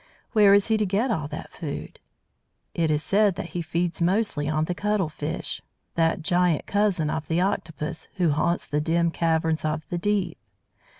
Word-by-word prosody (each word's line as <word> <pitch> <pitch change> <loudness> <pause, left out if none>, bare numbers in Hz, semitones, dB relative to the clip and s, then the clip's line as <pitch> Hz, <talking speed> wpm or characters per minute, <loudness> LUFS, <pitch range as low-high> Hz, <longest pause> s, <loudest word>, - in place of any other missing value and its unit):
Where 205 -3 +6
is 200 - +4
he 220 -1 +2
to 215 - +1
get 215 +7 +1
all 160 -9 -1
that - - -7
food? - - -6 0.7
It 165 -2 +1
is 150 0 +1
said 200 -1 +3
that 170 - -5
he 175 - -3
feeds 170 +1 -2
mostly 175 -5 +1
on 155 0 +1
the 180 - -2
Cuttle 205 -2 0
fish, - - -4 0.3
that 165 0 +1
giant 175 -2 +2
cousin 200 -7 +1
of 155 - -3
the 165 +1 +1
Octopus, 160 -4 -2
who 175 -5 +2
haunts 170 +4 +1
the 150 +1 -1
dim 170 +2 +1
caverns 160 -1 +1
of 155 0 -2
the 175 - -2
deep. 195 -3 0
170 Hz, 180 wpm, -25 LUFS, 160-195 Hz, 0.7 s, Where